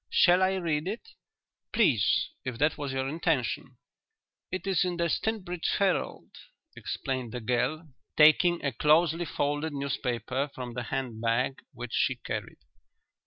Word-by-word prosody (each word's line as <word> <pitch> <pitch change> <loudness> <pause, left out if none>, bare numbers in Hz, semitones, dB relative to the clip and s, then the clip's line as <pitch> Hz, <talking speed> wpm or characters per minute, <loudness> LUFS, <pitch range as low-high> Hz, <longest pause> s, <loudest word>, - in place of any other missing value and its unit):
Shall 180 +1 +5
I 190 0 +3
read 165 -3 -1
it?" 225 - -5 0.6
"Please; 130 - +3
if 130 -3 -4
that 150 +5 +2
was 145 -2 -4
your 135 0 -1
intention." 160 +5 -1 0.7
"It 185 - -4
is 190 -4 +2
The 175 -2 +1
Stinbridge 180 -2 -1
Herald," 195 -2 0 0.4
explained 130 -4 -4
the 125 - -3
girl, 125 +7 -1 0.3
taking 165 +2 +5
a 140 - +1
closely 160 +6 +3
folded 145 +1 -1
newspaper 135 -1 -2
from 125 -2 -6
the 125 0 -4
handbag 120 0 -1
which 125 -1 -7
she - - +2
carried. - - -5
145 Hz, 130 wpm, -29 LUFS, 125-175 Hz, 0.7 s, Shall